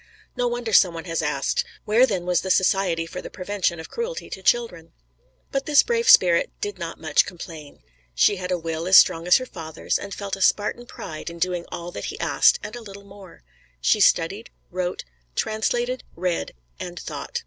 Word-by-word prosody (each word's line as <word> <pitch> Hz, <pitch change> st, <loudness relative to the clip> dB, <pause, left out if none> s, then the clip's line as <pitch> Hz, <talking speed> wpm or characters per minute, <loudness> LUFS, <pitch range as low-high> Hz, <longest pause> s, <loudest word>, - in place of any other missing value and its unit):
No 245 Hz, -, 0 dB
wonder 240 Hz, -2 st, -3 dB
some 180 Hz, -4 st, +5 dB
one 165 Hz, -, -7 dB
has 165 Hz, -1 st, -2 dB
asked, 150 Hz, -3 st, 0 dB, 0.2 s
"Where 230 Hz, +5 st, +4 dB
then 190 Hz, -6 st, -2 dB
was 180 Hz, -1 st, +1 dB
the 190 Hz, -, -5 dB
Society 185 Hz, -3 st, +2 dB
for 180 Hz, +2 st, -7 dB
the -, -, -8 dB
Prevention 185 Hz, -3 st, -2 dB
of 160 Hz, -, -9 dB
Cruelty 475 Hz, +1 st, -5 dB
to 190 Hz, -, -6 dB
Children?" 185 Hz, -6 st, 0 dB, 0.6 s
But 275 Hz, 0 st, -2 dB
this 295 Hz, -2 st, +6 dB
brave 470 Hz, 0 st, 0 dB
spirit 175 Hz, -2 st, +6 dB
did 205 Hz, -2 st, -4 dB
not 170 Hz, -1 st, -6 dB
much 160 Hz, -1 st, +3 dB
complain. 160 Hz, -, -10 dB, 0.3 s
She 195 Hz, -, +4 dB
had 180 Hz, 0 st, -5 dB
a 180 Hz, -, +1 dB
will 165 Hz, 0 st, -4 dB
as 190 Hz, -, +8 dB
strong 170 Hz, -2 st, +5 dB
as 180 Hz, -, +7 dB
her 255 Hz, -, -4 dB
father's, 160 Hz, -7 st, -4 dB
and 200 Hz, -, -8 dB
felt 200 Hz, -1 st, -4 dB
a 195 Hz, -, -10 dB
Spartan 210 Hz, +5 st, +1 dB
pride 155 Hz, -7 st, -7 dB
in 170 Hz, -, -10 dB
doing 175 Hz, 0 st, -2 dB
all 170 Hz, +1 st, -6 dB
that -, -, -6 dB
he -, -, -6 dB
asked -, -, +3 dB
and 210 Hz, +2 st, -6 dB
a 240 Hz, -, -8 dB
little 200 Hz, -2 st, -11 dB
more. 195 Hz, -, -15 dB, 0.4 s
She -, -, +2 dB
studied, 195 Hz, +8 st, +2 dB, 0.2 s
wrote, 180 Hz, 0 st, -3 dB, 0.3 s
translated, 240 Hz, +3 st, -1 dB
read 175 Hz, -, -2 dB, 0.2 s
and -, -, -6 dB
thought. -, -, -5 dB
185 Hz, 195 wpm, -23 LUFS, 170-215 Hz, 0.6 s, as